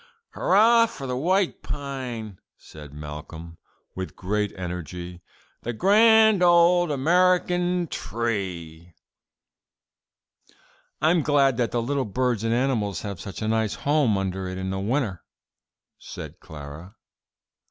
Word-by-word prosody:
'" 465 Hz, -, -53 dB
"Hurrah 230 Hz, +4 st, +4 dB
for 225 Hz, -12 st, -8 dB
the 125 Hz, -1 st, -3 dB
white 185 Hz, +7 st, 0 dB
pine," 125 Hz, -8 st, -6 dB, 0.2 s
said 75 Hz, -2 st, -13 dB
Malcolm, 75 Hz, +3 st, -9 dB, 0.3 s
with 95 Hz, 0 st, -6 dB
great 105 Hz, +2 st, -2 dB
energy, 90 Hz, 0 st, -6 dB, 0.4 s
"the 120 Hz, -, -4 dB
grand 220 Hz, -, +5 dB
old 175 Hz, 0 st, +5 dB
American 180 Hz, +4 st, +2 dB
tree!" 90 Hz, -, -4 dB, 2.1 s
"I'm 165 Hz, +2 st, +3 dB
glad 140 Hz, -4 st, +2 dB
that 120 Hz, -2 st, +1 dB
the 120 Hz, -1 st, -1 dB
little 140 Hz, +2 st, -1 dB
birds 120 Hz, +1 st, -1 dB
and 115 Hz, -, 0 dB
animals 115 Hz, -5 st, 0 dB
have 100 Hz, -5 st, -6 dB
such 100 Hz, +2 st, -7 dB
a -, -, -1 dB
nice 110 Hz, -1 st, 0 dB
home 140 Hz, -8 st, +1 dB
under 95 Hz, -1 st, -3 dB
it 95 Hz, 0 st, -5 dB
in 95 Hz, 0 st, -3 dB, 0.2 s
winter," 115 Hz, -, -1 dB, 0.8 s
said -, -, -9 dB
Clara. 75 Hz, +6 st, -10 dB
115 Hz, 120 wpm, -24 LUFS, -, 2.1 s, grand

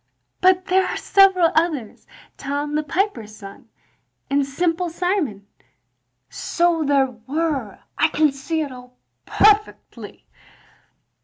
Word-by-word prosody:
"But 370 Hz, 0 st, +3 dB
there 380 Hz, 0 st, +2 dB
are -, -, -3 dB
several 380 Hz, -4 st, +4 dB
others, 315 Hz, -9 st, -2 dB, 0.3 s
Tom 285 Hz, +2 st, -4 dB
the 305 Hz, -, +1 dB
Piper's 295 Hz, -, -3 dB
son, 200 Hz, +2 st, -13 dB, 0.6 s
and 280 Hz, 0 st, +2 dB
Simple 335 Hz, +5 st, -1 dB
Simon." 330 Hz, -, -2 dB, 0.8 s
"So 340 Hz, -2 st, 0 dB
there 275 Hz, -2 st, +2 dB, 0.2 s
were, 285 Hz, -8 st, -2 dB, 0.2 s
I -, -, +5 dB
can 305 Hz, -2 st, +2 dB
see 290 Hz, +4 st, -3 dB
it 290 Hz, -3 st, -4 dB
all 250 Hz, 0 st, -13 dB, 0.3 s
perfectly. 425 Hz, 0 st, 0 dB
305 Hz, 110 wpm, -21 LUFS, 270-355 Hz, 0.8 s, I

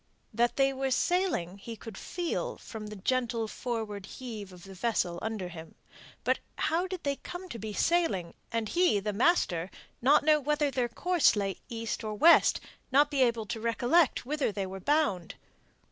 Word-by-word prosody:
That 240 Hz, +2 st, +2 dB
they 270 Hz, 0 st, +3 dB
were 270 Hz, 0 st, -1 dB
sailing 260 Hz, -, 0 dB
he 230 Hz, +3 st, -7 dB
could 225 Hz, -1 st, -10 dB
feel 345 Hz, -, -3 dB
from 215 Hz, -2 st, -8 dB
the 210 Hz, -, -7 dB
gentle 235 Hz, +2 st, -1 dB
forward 215 Hz, -4 st, -4 dB
heave 220 Hz, -6 st, -7 dB
of 180 Hz, -1 st, -13 dB
the 195 Hz, -, -10 dB
vessel 185 Hz, -4 st, -1 dB
under 220 Hz, -4 st, -3 dB
him. 165 Hz, -2 st, -10 dB, 0.5 s
But -, -, +2 dB, 0.2 s
how 340 Hz, +4 st, +1 dB
did 370 Hz, -2 st, -6 dB
they 280 Hz, -1 st, -1 dB
come 360 Hz, +1 st, -8 dB
to 235 Hz, -, -6 dB
be 215 Hz, +1 st, -5 dB
sailing, 205 Hz, -, +1 dB, 0.2 s
and 230 Hz, -1 st, -1 dB
he, 350 Hz, -, +3 dB
the 210 Hz, +1 st, -3 dB
master, 195 Hz, -, +2 dB, 0.3 s
not 285 Hz, +5 st, +5 dB
to -, -, -12 dB
know 305 Hz, -1 st, +5 dB
whether 295 Hz, 0 st, +1 dB
their 250 Hz, -3 st, 0 dB
course 355 Hz, +4 st, +3 dB
lay 195 Hz, -2 st, -1 dB
east 230 Hz, -1 st, -4 dB
or 215 Hz, -1 st, -3 dB
west, 335 Hz, +10 st, +6 dB, 0.3 s
not 290 Hz, +3 st, +4 dB
to -, -, -4 dB
be -, -, +3 dB
able 235 Hz, -3 st, +2 dB
to 220 Hz, +3 st, -4 dB
recollect 245 Hz, +7 st, +2 dB
whither 290 Hz, -2 st, 0 dB
they 200 Hz, -1 st, -3 dB
were 190 Hz, +1 st, -7 dB
bound? 200 Hz, -, +1 dB
235 Hz, 185 wpm, -30 LUFS, 205-295 Hz, 0.5 s, west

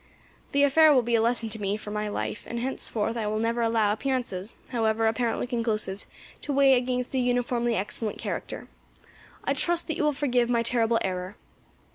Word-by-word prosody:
The 280 Hz, 0 st, +3 dB
affair 310 Hz, +2 st, +6 dB
will 260 Hz, -4 st, +4 dB
be 235 Hz, +1 st, -2 dB
a 230 Hz, -, +4 dB
lesson 230 Hz, 0 st, +1 dB
to 220 Hz, 0 st, -7 dB
me 200 Hz, +1 st, 0 dB
for 210 Hz, -1 st, -8 dB
my 210 Hz, 0 st, -2 dB
life, 210 Hz, 0 st, -4 dB
and 235 Hz, -, -4 dB
henceforth 230 Hz, -3 st, -2 dB
I 225 Hz, -3 st, -2 dB
will 215 Hz, +1 st, -1 dB
never 230 Hz, +2 st, 0 dB
allow 225 Hz, -2 st, +2 dB
appearances, 235 Hz, -5 st, -2 dB
however 225 Hz, -2 st, +1 dB
apparently 225 Hz, +1 st, 0 dB
conclusive, 220 Hz, -5 st, -2 dB, 0.3 s
to 295 Hz, -, -4 dB
weigh 275 Hz, -1 st, +5 dB
against 250 Hz, 0 st, 0 dB
a 260 Hz, -, +1 dB
uniformly 245 Hz, -1 st, +1 dB
excellent 210 Hz, +2 st, -2 dB
character. -, -, -5 dB, 0.8 s
I -, -, +1 dB
trust 345 Hz, 0 st, 0 dB
that 320 Hz, -, -1 dB
you -, -, 0 dB
will 300 Hz, -, +3 dB
forgive 250 Hz, -4 st, +1 dB
my 235 Hz, -1 st, +2 dB
terrible 230 Hz, -1 st, +2 dB
error." 185 Hz, +1 st, -3 dB
235 Hz, 185 wpm, -27 LUFS, 220-250 Hz, 0.8 s, affair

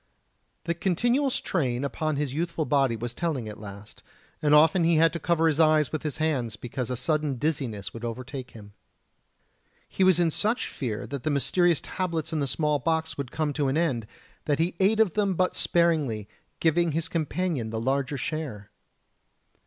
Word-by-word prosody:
The 170 Hz, -, 0 dB
continual 240 Hz, -, +1 dB
strain 140 Hz, -, -1 dB
upon 155 Hz, +2 st, -1 dB
his 140 Hz, -2 st, -2 dB
youthful 165 Hz, +1 st, -1 dB
body 135 Hz, -5 st, +2 dB
was 120 Hz, +2 st, -5 dB
telling 145 Hz, -7 st, -2 dB
at 105 Hz, -, -8 dB
last, 100 Hz, 0 st, -10 dB, 0.4 s
and 150 Hz, 0 st, +4 dB
often 160 Hz, +4 st, +5 dB
he 165 Hz, 0 st, +4 dB
had 165 Hz, 0 st, +4 dB
to 170 Hz, -, -3 dB
cover 165 Hz, -1 st, +1 dB
his 160 Hz, -1 st, +2 dB
eyes 155 Hz, -3 st, +4 dB
with 155 Hz, -, -2 dB
his 150 Hz, -1 st, -3 dB
hands, 135 Hz, -8 st, -1 dB
because 125 Hz, +2 st, -5 dB
a 125 Hz, -, -2 dB
sudden 150 Hz, +1 st, 0 dB
dizziness 125 Hz, -8 st, -2 dB
would 115 Hz, -, -8 dB
overtake 130 Hz, +2 st, -5 dB
him. 105 Hz, -3 st, -13 dB, 1.1 s
He 190 Hz, -, 0 dB
was 185 Hz, -2 st, +5 dB
in 170 Hz, -2 st, +3 dB
such 215 Hz, +9 st, 0 dB
fear 115 Hz, -6 st, -4 dB
that 140 Hz, -2 st, -5 dB
the 155 Hz, -, -1 dB
mysterious 170 Hz, +3 st, +2 dB
tablets 170 Hz, -4 st, -3 dB
in 155 Hz, -, 0 dB
the 140 Hz, -, 0 dB
small 150 Hz, +2 st, 0 dB
box 160 Hz, +3 st, -1 dB
would 140 Hz, -3 st, -4 dB
come 155 Hz, -2 st, -1 dB
to 145 Hz, -1 st, 0 dB
an 135 Hz, +3 st, +1 dB
end 130 Hz, -10 st, 0 dB, 0.4 s
that 145 Hz, -2 st, +1 dB
he 165 Hz, +3 st, 0 dB
ate 205 Hz, +3 st, +3 dB
of 220 Hz, -6 st, +4 dB
them 200 Hz, -3 st, +1 dB
but 185 Hz, +1 st, +1 dB
sparingly, 150 Hz, -, +1 dB, 0.3 s
giving 165 Hz, 0 st, +2 dB
his 165 Hz, +1 st, -1 dB
companion 160 Hz, -6 st, -1 dB
the 110 Hz, 0 st, -3 dB
larger 135 Hz, +3 st, 0 dB
share. 135 Hz, -8 st, -5 dB
150 Hz, 185 wpm, -27 LUFS, 130-165 Hz, 1.1 s, often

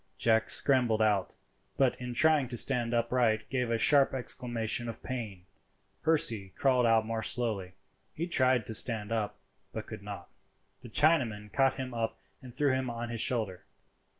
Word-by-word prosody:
Jack 110 Hz, -1 st, +1 dB
scrambled 125 Hz, -5 st, +4 dB
out, 105 Hz, -3 st, 0 dB, 0.4 s
but 135 Hz, -2 st, +2 dB
in 125 Hz, -1 st, -6 dB
trying 155 Hz, -1 st, +3 dB
to 120 Hz, 0 st, -4 dB
stand 120 Hz, -2 st, +2 dB
upright 115 Hz, -2 st, 0 dB
gave 125 Hz, -3 st, -1 dB
a 115 Hz, -, 0 dB
sharp 140 Hz, +2 st, +4 dB
exclamation 120 Hz, -2 st, -1 dB
of 115 Hz, -, -9 dB
pain. 110 Hz, -8 st, -6 dB, 0.6 s
Percy 115 Hz, -, 0 dB
crawled 130 Hz, -3 st, +2 dB
out 115 Hz, -1 st, +3 dB
more 115 Hz, 0 st, -3 dB
slowly; 110 Hz, -7 st, -2 dB, 0.4 s
he 165 Hz, -, -4 dB
tried 130 Hz, -, +2 dB
to 110 Hz, -, -4 dB
stand 110 Hz, -2 st, +3 dB
up, 110 Hz, -3 st, -2 dB, 0.3 s
but -, -, -6 dB
could -, -, -9 dB
not. -, -, -9 dB, 0.5 s
The 120 Hz, -, -11 dB
Chinaman 110 Hz, -8 st, +1 dB
caught 135 Hz, -1 st, +2 dB
him 130 Hz, -2 st, -6 dB
up 115 Hz, -1 st, -3 dB, 0.2 s
and 130 Hz, -2 st, -11 dB
threw 140 Hz, +2 st, 0 dB
him 130 Hz, -1 st, -2 dB
on 120 Hz, 0 st, -5 dB
his 115 Hz, -2 st, -1 dB
shoulder. 110 Hz, -8 st, -2 dB
120 Hz, 165 wpm, -29 LUFS, 110-130 Hz, 0.6 s, scrambled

